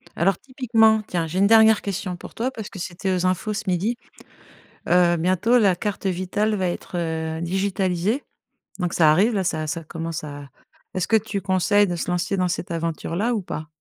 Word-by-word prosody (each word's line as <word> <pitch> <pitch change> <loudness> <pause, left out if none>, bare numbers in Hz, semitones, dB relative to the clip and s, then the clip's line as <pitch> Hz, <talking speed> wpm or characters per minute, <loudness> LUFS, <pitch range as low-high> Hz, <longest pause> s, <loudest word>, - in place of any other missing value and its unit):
Alors 185 +2 +2
typiquement, 225 -4 +2
tiens, 170 -2 -1
j'ai 175 +4 -2
une 200 - +5
dernière 220 0 +6
question 190 -2 -3
pour - - -11
toi 250 +3 -2
parce 220 -5 -7
que 195 - -10
c'était 175 +2 -3
aux 180 0 -1
infos 185 +4 0
ce 200 - -3
midi, 190 +6 0 0.9
heu, 175 -1 +4
bientôt 185 +8 +2
la 200 -6 +4
carte 200 +2 -4
vitale 190 +4 0
va 190 -2 0
être, 175 0 -5
heu, 160 -1 -2
digitalisée 190 +5 0 0.6
donc 180 -2 -1
ça 155 -3 +5
arrive, 200 +9 +3
là, 195 - +1
ça 155 -3 -2
ça 165 +2 -3
commence 165 0 -5
à 145 -2 -8 0.5
est-ce 185 -2 -1
que 225 - +3
tu 210 -2 -1
conseilles 190 +2 +3
de 175 - -2
se 170 - -4
lancer 180 +2 -1
dans 185 -1 +1
cette 180 +1 -4
aventure-là 170 +6 -2
ou 210 - -1
pas? 160 -3 -6
185 Hz, 195 wpm, -23 LUFS, 170-210 Hz, 0.9 s, dernière